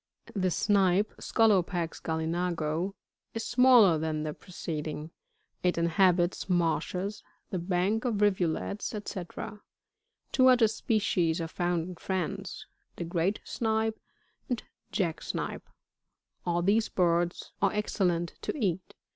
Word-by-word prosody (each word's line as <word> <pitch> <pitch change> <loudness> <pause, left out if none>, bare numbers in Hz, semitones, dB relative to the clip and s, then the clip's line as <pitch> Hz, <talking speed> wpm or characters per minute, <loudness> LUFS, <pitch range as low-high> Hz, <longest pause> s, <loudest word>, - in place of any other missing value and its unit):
] - - -54
54. 195 - -2
The 185 - +3
Snipe, 195 +1 +2
— - - -17
Scolopax 180 -6 +2
galUnago, 165 +2 -1 0.2
— - - -56
is 225 - -2
smaller 240 -9 +6
than 155 -1 -1
the 155 -1 -3
pre 185 - -17
ceding; 155 -2 -4 0.5
it 180 -1 +1
inhabits 175 +2 +2
marshes, 180 +3 0 0.3
the 185 - -1
banks 190 +7 0
of 235 - 0
nvulets, 200 -1 +1
&c. 205 -4 -5 0.9
Two 260 -1 +5
other 250 -3 +6
species 200 -7 +1
are 165 - -2
found 175 0 -1
in 180 - -7
France, 190 +1 -3 0.3
the - - -4
Great 170 +4 0
Snipe, 220 -1 -1 0.5
and 245 -3 -1 0.3
Jack 170 -5 -1
Snipe. - - -4 0.8
All 175 0 +1
these 215 +4 +3
birds 175 -1 +1
are 195 - +4
excellent 180 -5 0
to - - -3
eat. 190 - -2
180 Hz, 130 wpm, -29 LUFS, 170-205 Hz, 0.9 s, smaller